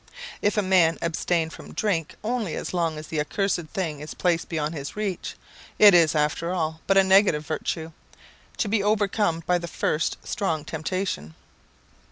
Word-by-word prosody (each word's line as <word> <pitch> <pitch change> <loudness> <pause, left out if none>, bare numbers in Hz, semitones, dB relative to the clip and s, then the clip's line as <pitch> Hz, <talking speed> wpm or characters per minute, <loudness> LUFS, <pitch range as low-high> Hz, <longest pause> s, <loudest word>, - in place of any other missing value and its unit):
If 205 +1 +1
a 210 - +3
man 180 -3 +4
abstain 165 0 0
from - - -11
drink 170 -8 -1
only 220 -6 -2
as - - -5
long 165 -3 0
as 155 - -7
the 155 0 -3
accursed 175 +2 -1
thing 160 -6 -3
is 150 +1 -8
placed 175 -2 0
beyond 155 -1 -2
his 140 -3 -6
reach, 210 -3 -3 0.4
it 205 -2 +8
is 165 -2 +5
after 150 +3 0
all 160 -3 -2
but 195 - +4
a 195 - +7
negative 190 -5 +4
virtue, 160 +1 -3 0.7
to - - 0
be 210 0 +1
overcome 205 -4 +1
by 180 +1 +2
the 170 - -6
first 155 -1 -1
strong 160 -6 -2
temptation. 160 - -3
170 Hz, 170 wpm, -25 LUFS, 155-195 Hz, 0.7 s, it